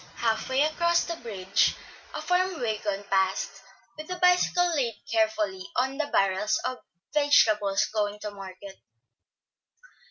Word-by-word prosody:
Half 225 0 -1
way 265 +2 +3
across 340 +2 +2
the 335 - -4
bridge 195 - 0 0.4
a - - -4
farm 360 -1 +1
wagon 210 -3 -2
passed, 190 0 0 0.3
with 310 +2 -9
a 365 - -2
bicycle 360 -1 +3
laid 240 -6 0 0.2
carefully 215 -4 0
on 265 +3 0
the 305 - 0
barrels 195 -2 +1
of 255 0 -3 0.3
vegetables 215 -9 +3
going 210 -1 -1
to 210 - -5
market. 195 0 -10
225 Hz, 130 wpm, -27 LUFS, 200-305 Hz, 0.4 s, way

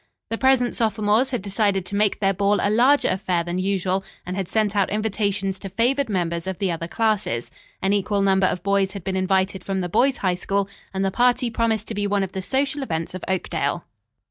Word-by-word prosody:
The 225 - 0
present 260 -2 +3
sophomores 220 +2 +2
had 245 -7 -3
decided 200 -2 0
to 205 - -4
make 205 -1 +2
their 195 -1 +2
ball 200 +2 +2
a 205 - +1
larger 255 +6 +4
affair 185 -2 0
than 175 +2 -3
usual, 190 0 0 0.2
and 180 +1 -4
had 195 -2 -2
sent 215 0 0
out 200 -2 +2
invitations 205 -2 -1
to 195 - -6
favored 245 +7 +1
members 170 -3 -1
of 190 -2 -3
the 195 -3 0
other 165 0 -4
classes. 210 - -1 0.3
An 195 +1 +2
equal 200 0 +1
number 190 -1 +3
of 180 - -3
boys 200 -1 +1
had 200 -4 -7
been 190 +1 -2
invited 190 0 0
from 190 -1 -2
the 175 - -3
boys' 265 +9 +2
High 185 -2 +1
School, 195 +2 -1 0.2
and 195 0 -1
the 195 - 0
party 245 +2 +2
promised 225 -2 0
to - - -3
be 205 -1 -1
one 200 -1 +1
of 190 - -4
the 190 - -4
social 275 +7 0
events 165 -11 -3
of 185 - -7
Oakdale. 180 -2 -1
200 Hz, 220 wpm, -23 LUFS, 190-220 Hz, 0.3 s, larger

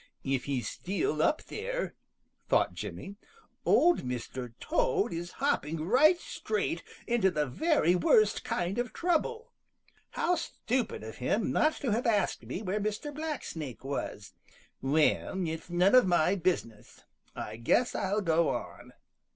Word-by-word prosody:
"If 135 -2 -1
he's 135 -4 -2
still 175 -5 -1
up 305 - +2
there," - - -4 0.6
thought - - +3
Jimmy, 200 +1 -7 0.5
"Old 350 +1 +5
Mr. 125 -1 -5
Toad 410 - +1
is 175 +1 -5
hopping 160 - -1
right 295 - +5
straight 435 - -2 0.2
into 235 -5 +3
the 150 -5 0
very 235 - +2
worst 210 +4 +3
kind 180 +5 -1
of 245 0 -2
trouble. 360 +7 -1 0.6
How 360 - +2
stupid 255 - -2
of 110 0 -8
him 200 - 0
not 310 +1 +3
to 255 - 0
have 235 +4 0
asked 215 -3 +1
me 200 - -4
where 200 +2 -1
Mr. 215 +8 -3
Blacksnake 255 - -5
was! 135 -6 -5 0.5
Well, 155 +5 +1
it's 160 +2 -5
none 180 +3 +3
of 255 -6 +7
my 175 0 +3
business. 170 - -2 0.3
I 110 - -6
guess 180 - +2
I'll 205 +3 0
go 165 -2 +2
on." - - -5
190 Hz, 140 wpm, -30 LUFS, -, 0.6 s, of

